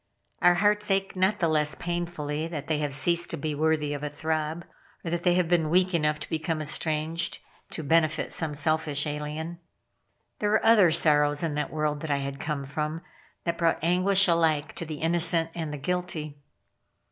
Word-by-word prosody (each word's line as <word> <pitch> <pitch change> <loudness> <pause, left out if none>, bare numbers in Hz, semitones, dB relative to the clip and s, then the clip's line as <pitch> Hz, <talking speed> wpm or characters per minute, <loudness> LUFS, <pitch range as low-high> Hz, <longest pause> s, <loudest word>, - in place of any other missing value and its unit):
Our 175 0 +5
hearts 210 +2 +1
ache 195 0 0
not 190 +3 +1
the 170 - +2
less 150 -1 +1
painfully 165 -3 -4
that 155 -4 -6
they 155 -1 -1
have 145 -2 -2
ceased 170 +4 +3
to - - -2
be 150 +1 -3
worthy 150 -1 0
of 145 - -5
a 150 - -3
throb; 155 +2 -3 0.4
or 165 - -3
that 175 0 -1
they 175 0 +2
have 180 -2 +1
been 165 -2 +1
weak 185 +2 +2
enough 150 -2 +1
to - - -7
become 160 0 -2
estranged, 155 +2 0 0.3
to 160 - -6
benefit 155 +1 +1
some 155 -3 0
selfish 155 -2 0
alien. 150 +3 -5 0.8
There 210 - 0
were 215 - +1
other 220 -6 +6
sorrows 150 -1 +3
in 160 -3 -1
that 150 0 -3
world 150 -1 -1
that 160 - -6
I 140 - +1
had 140 0 -5
come 145 -2 -4
from, 150 +3 -4 0.4
that 170 -1 -3
brought 165 -1 +2
anguish 185 +3 +4
alike 160 -3 +1
to 170 - -4
the 155 -2 -7
innocent 165 0 +2
and 160 -3 -5
the 150 - -5
guilty. 155 -2 -4
160 Hz, 190 wpm, -26 LUFS, 150-175 Hz, 0.8 s, other